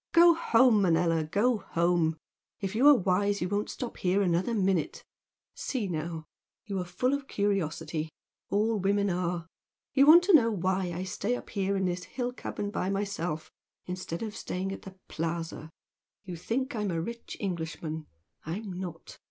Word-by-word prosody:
Go 340 0 +8
home, 240 -8 +4
Manella, 165 -2 +3
go 210 +10 +2
home! 170 -3 +1 0.4
If 195 -1 -3
you 250 +6 +4
are 295 - +10
wise 200 +1 +1
you 175 - -1
won't 205 +2 -1
stop 245 - -5
here 190 +2 +2
another 180 +6 +1
minute! 190 -6 0 0.5
See 255 -6 -3
now! 165 -1 -4 0.4
You 200 -3 -3
are 180 - -2
full 215 +10 0
of 280 -1 -2
curiosity 165 - -1 0.4
all 215 +1 +1
women 200 +1 +2
are! 175 -1 -1 0.5
You 275 +1 +5
want 340 +3 +9
to 390 +1 +3
know 240 -8 +7
why 185 -2 0
I 175 +2 -3
stay 200 +5 -1
up - - -9
here 200 -1 0
in 190 - 0
this 180 0 -2
hill 245 -1 -3
cabin 205 -4 -4
by 190 - -1
myself 195 -5 -2 0.3
instead 180 0 -4
of 215 -1 -5
staying 190 +1 -3
at 195 - -6
the 190 -1 -11
'Plaza.' 165 -1 -4 0.5
You 180 -3 -6
think 245 - -2
I'm 210 -2 -1
a 165 -2 -1
rich 235 +8 -6
Englishman. 160 -4 -4 0.4
I'm 190 +5 -5
not. 175 -2 -7
190 Hz, 170 wpm, -29 LUFS, 170-220 Hz, 0.5 s, are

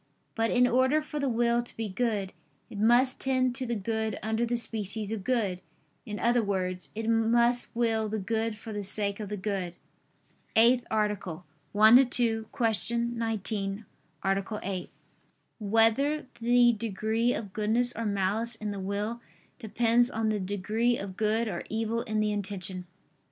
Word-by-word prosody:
But 225 0 0
in 250 0 +4
order 260 +4 +3
for 300 -1 -5
the 280 -2 0
will 235 0 +2
to 240 - -14
be 225 -1 -2
good, 205 -2 -2 0.4
it 205 - -7
must 240 +4 +4
tend 255 -2 +1
to 255 0 -4
the 235 - -1
good 220 0 -2
under 220 +2 0
the 240 +1 0
species 215 -2 -3
of 220 -3 -4
good; 205 -7 0 0.5
in 210 -1 -4
other 240 +2 +2
words, 185 -3 -2
it 225 0 -3
must 235 +2 +2
will 225 -2 +1
the 220 - -2
good 220 +2 -2
for 220 0 -8
the 205 - -3
sake 200 +1 -1
of 210 -2 -5
the 210 - -3
good. 190 -3 -3
________________________ - - -28 0.8
EIGHTH 240 +2 +5
ARTICLE 205 -5 -2 0.3
[I 215 +3 +8
II, 270 - +5
Q. 225 -3 +1 0.7
19, 215 -2 -2 0.4
Art. 195 0 0 0.2
8] 185 -2 -4 0.7
Whether 225 +8 +2 0.2
the 240 0 +5
Degree 220 +2 -1
of 205 -4 -6
Goodness 230 +3 +1
or 230 - -3
Malice 205 +4 0
in 215 -1 -4
the 200 - -5
Will 205 +5 -3 0.4
Depends 235 +1 +2
on 220 -2 -1
the 215 -1 0
Degree 210 +5 0
of 195 -2 -6
Good 220 +2 +1
or 175 -5 -3
Evil 225 +1 -1
in 215 -1 -2
the 215 0 +1
Intention? 190 -3 -3
220 Hz, 165 wpm, -28 LUFS, 205-235 Hz, 0.8 s, I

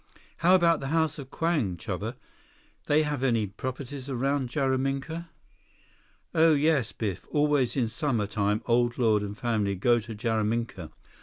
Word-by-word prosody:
"How 180 +2 +5
about 170 -2 +4
the 135 - -5
House 160 0 0
of 135 -2 -8
Kwang, 145 - 0
Chuba? - - -4 0.7
They 150 +1 +4
have 145 -3 -2
any 115 -5 +2
properties 130 +6 -6
around 135 0 0
Jaraminka?" 135 +5 -1 1.0
"Oh 160 -1 +5
yes, 145 -5 +2
Biff, 100 -5 -4
always 145 -4 +2
in 120 -3 +2
summer 120 -4 -1
time 105 +1 -1
Old 120 0 +2
Lord 110 -4 +3
and 105 0 -5
family 105 -5 0
go 120 +5 +3
to 115 0 -8
Jaraminka. 110 -5 -1
130 Hz, 145 wpm, -27 LUFS, 110-145 Hz, 1.0 s, How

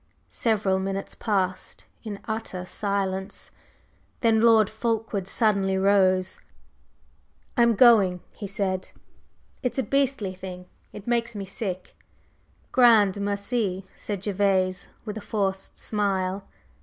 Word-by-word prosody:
Several 205 -4 +1
minutes 195 +1 -3
passed 185 -4 -2 0.2
in 210 -3 -5
utter 220 -5 -4
silence, 195 0 -3 0.7
then 225 -2 +4
Lord 225 -3 +6
Fulkeward 220 -3 -2
suddenly 195 -3 +2
rose. 190 -1 +2 1.1
"I'm 235 -2 +4
going!" 200 -6 +6
he 205 - -7
said. 190 -2 -1 0.7
"It's 250 - -2
a 265 - +1
beastly 270 -9 0
thing; 180 -1 -8 0.3
it 205 - -10
makes 235 -1 0
me 200 -1 -4
sick!" 190 -1 -5 0.8
"Grand 215 -6 +5
merci!" 200 -1 -1
said 200 -2 -5
Gervase 190 -2 +1 0.2
with 215 0 -4
a - - -11
forced 195 -3 -2
smile. 195 -2 -1
200 Hz, 110 wpm, -25 LUFS, 190-220 Hz, 1.1 s, Lord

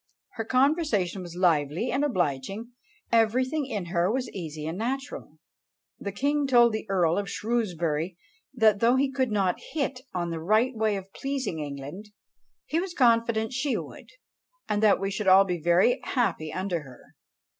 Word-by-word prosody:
Her 225 - -5
conversation 255 - +1
was 175 -1 -9
lively 170 - +1
and 270 +3 0
obliging; 195 - -2 0.4
everything 255 +6 +2
in 210 -8 -3
her 175 +2 +2
was 255 +1 -2
easy 155 -5 -6
and 160 +2 -3
natural. 260 +7 -4 0.6
The 200 - -4
king 285 +6 0
told 240 -3 +5
the 220 0 -4
Earl 175 -2 +2
of 200 -2 -4
Shrewsbury, 180 -6 -1 0.3
that 220 -5 +3
though 235 +3 +4
he 270 +1 +1
could 260 -2 0
not 195 -3 0
hit 275 -4 -2
on 175 -2 -2
the 165 - -3
right 220 +8 +2
way 220 -1 +1
of 195 0 -8
pleasing 270 - -3
England, 145 +7 -7 0.6
he 325 - 0
was 365 0 -4
confident 230 -2 +2
she 265 +2 0
would, - - -9 0.6
and 210 0 0
that 215 -2 +5
we 195 +1 -2
should 195 +1 -3
all 190 +1 +8
be 180 -3 -3
very 175 - +3
happy 225 - -1
under 185 -3 -2
her." 130 -4 -15
210 Hz, 165 wpm, -27 LUFS, 175-255 Hz, 0.6 s, all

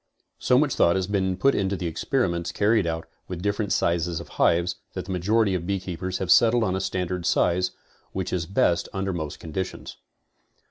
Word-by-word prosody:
So 125 - +3
much 145 0 +2
thought 85 - +3
has 95 -1 0
been 95 -2 0
put 135 +8 +3
into 100 0 0
the 90 - -4
experi 120 - 0
ments 85 -1 -3
carried 105 0 +2
out 80 0 -3 0.2
with 90 -1 -6
different 100 0 -1
sizes 85 -1 +1
of 85 - -10
hives, 85 +1 +2 0.2
that - - -5
the 95 - -6
majority 100 +3 +2
of 90 -2 -2
beekeepers 95 -1 -3
have 95 - -1
settled 120 0 +5
on 95 -3 0
a 95 - -1
standard 90 -1 -2
size, 90 +1 +2 0.4
which 95 -2 -3
is 85 -3 -1
best 95 -4 +1
un 95 -1 -2
der 95 - -1
most 80 -4 -5
conditions. 90 +3 -5
95 Hz, 195 wpm, -25 LUFS, 85-100 Hz, 0.4 s, settled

